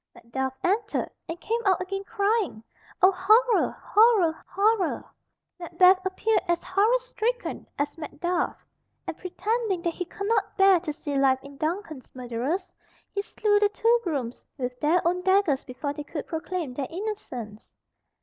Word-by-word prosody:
Macduff 265 +3 -4
entered, 420 +4 0 0.2
and 335 +1 -5
came 460 +5 -1
out 375 -1 +4
again 390 +2 -4
crying, 405 - 0 0.4
"O 375 - +8
horror! 440 +6 +4
horror! 415 -7 +4
horror!" 400 -1 +1 0.5
Macbeth 365 +2 +4
appeared 380 +4 +1
as 345 0 0
horror 410 +6 +3
stricken - - -3
as 290 +2 -2
Macduff, 345 +3 -2 0.4
and - - -4
pretending 400 0 -2
that 340 - 0
he 360 - -4
could 400 +3 -6
not 435 -3 0
bear 385 -2 +6
to 325 -2 -4
see 290 -1 -5
life 265 -1 +4
in 280 0 -11
Duncan's 315 -2 -4
murderers, 255 +10 -3 0.4
he 400 - -1
slew 415 0 +1
the 415 0 +4
two 460 +3 +3
grooms 270 -9 -3
with 250 -1 -4
their 340 +4 +2
own 360 +1 +1
daggers 375 -7 +2
before 280 +3 -4
they 295 0 -6
could 295 +1 -6
proclaim 325 -3 -4
their 265 0 -3
innocence. 325 - -6
360 Hz, 150 wpm, -26 LUFS, 295-410 Hz, 0.5 s, O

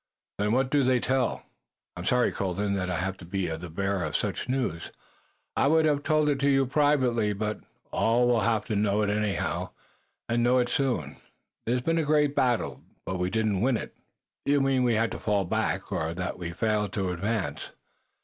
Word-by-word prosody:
"Then 105 +1 +1
what 130 +1 +1
do 145 -2 +3
they 130 -1 +3
tell?" 130 0 0 0.5
"I'm 90 0 -6
sorry, 125 +4 +3
Colden, 100 +1 -1
that 90 -2 -1
I 90 - -1
have 95 +3 -2
to - - -13
be 95 +1 -2
the 85 +1 -5
bearer 95 +2 -1
of 75 -2 -3
such - - -3
news. 125 -11 -2 0.6
I - - +3
would 160 +2 +4
have 145 -2 +2
told 155 0 +2
it 140 -2 0
to 140 +1 +2
you 135 -1 +4
privately, 130 -6 +2
but 105 +1 -3 0.3
all 120 +2 +2
will 120 -1 +3
have 110 0 +1
to 110 - -2
know 105 +1 +2
it 100 - +1
anyhow, 105 -4 -1 0.6
and 120 0 +1
know 125 +2 +4
it 120 -1 +2
soon. 135 -2 -1 0.5
There 120 - +2
has 125 - -2
been 165 +2 +1
a - - +1
great 150 -1 +2
battle, 125 -4 0 0.2
but 95 -1 -3
we 90 0 0
did 110 +3 0
not 100 -3 0
win 125 0 +2
it." - - -8 0.5
"You 145 0 +3
mean 135 -1 +2
we 120 -2 +2
had 115 +1 +1
to - - -5
fall 100 -2 0
back, - - -1
or 80 +1 -2
that 90 +1 -4
we 85 -1 -4
failed 105 +2 -1
to 95 -3 -1
advance? 95 -4 -2
110 Hz, 205 wpm, -27 LUFS, 95-130 Hz, 0.6 s, would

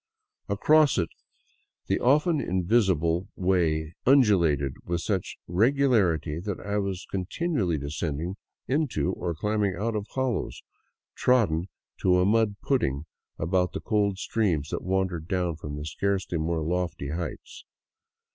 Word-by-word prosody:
Across 155 -2 +4
it 85 -3 0 0.8
the - - 0
often 150 +4 +3
invisible 90 -2 +1
way 85 -4 +1
undulated 85 - +4
with 85 0 -2
such 95 -2 -2
regu 110 +11 +3
larity 85 - +1
that 100 -2 -3
I 100 +1 -2
was 95 -2 -3
continually 100 - -1
descending 75 +4 -3 0.3
into 130 - 0
or 85 -2 -3
climbing 105 +1 0
out 110 +4 -2
of 105 0 -3
hollows 130 -3 -2 0.5
trodden 100 -10 +2 0.3
to 90 -1 +3
a 90 - +3
mud 110 0 +2
pudding 70 - 0 0.3
about 90 +2 0
the - - -3
cold 105 -3 0
streams 90 -9 0
that - - -3
wandered 95 -3 -1
own 90 -3 0
from 75 -2 -6
the 75 - -5
scarcely 95 0 -1
more 80 +1 -1
lofty 85 -4 -2
heights. 85 +1 -6
95 Hz, 130 wpm, -27 LUFS, 80-105 Hz, 0.8 s, Across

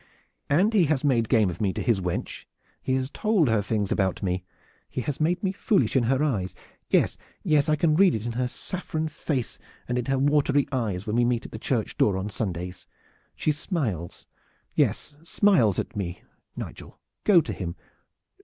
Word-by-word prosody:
And 185 +10 +3
he 195 -6 +5
has 145 -2 0
made 120 -6 +2
game 110 -5 +4
of 85 - -8
me 100 -3 +2
to - - -3
his 115 -6 +2
wench. 90 -1 -4 0.4
He 130 - 0
has 130 +1 -2
told 210 - +2
her 110 -2 +3
things 105 -1 -1
about 95 -1 0
me. 90 -1 -1 0.5
He 130 - -3
has 140 +3 -3
made 170 +5 +1
me 190 - +1
foolish 200 - +1
in 125 -3 +3
her 135 +4 +2
eyes. 100 -11 -1 0.3
Yes, - - +2 0.2
yes, 150 0 +3
I 155 - +4
can 155 0 +2
read 185 -2 +5
it 110 0 -4
in 120 - -2
her 125 +2 -1
saffron 160 +2 -4
face 140 -5 -3 0.3
and 125 0 0
in 120 - -3
her 135 +1 +1
watery 145 0 +3
eyes 105 -8 -1
when 110 +2 -1
we 120 - +4
meet 120 -1 0
at - - -9
the 110 - -7
church 115 -2 -1
door 100 -3 +3
on 95 +2 -3
Sundays. 90 -3 -4 0.5
She 155 - +1
smiles 130 - -3 0.5
yes, - - 0
smiles 165 - +3
at - - -3
me! 90 -3 -4 0.3
Nigel, - - -8 0.2
go 200 -5 +6
to 160 - -3
him! 85 -3 -5
125 Hz, 190 wpm, -26 LUFS, 105-155 Hz, 0.5 s, go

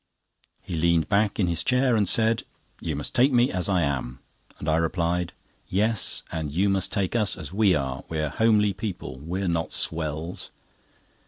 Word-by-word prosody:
He 90 - -7
leaned 85 0 +2
back 105 0 +1
in 95 - +3
his 85 -1 0
chair 125 -1 +3
and 105 -4 +2
said: 115 0 +3 0.4
"You 80 -3 -3
must 70 - -4
take 130 +3 +4
me 125 +1 +3
as 90 +1 0
I 90 -3 +2
am;" 65 -3 -2 0.4
and - - -7
I 80 0 +3
replied: 85 +1 0 0.4
"Yes—and 95 -6 0
you 95 +7 +2
must 95 -1 +1
take 100 0 -1
us 105 -4 +2
as 80 -2 -8
we 100 -3 +4
are. 65 -2 -3
We're 75 -2 -1
homely 105 -1 +3
people, 90 - -6
we 90 +7 -4
are - - -1
not 85 -1 -1
swells." 80 +1 -3
90 Hz, 175 wpm, -25 LUFS, 80-105 Hz, 0.4 s, take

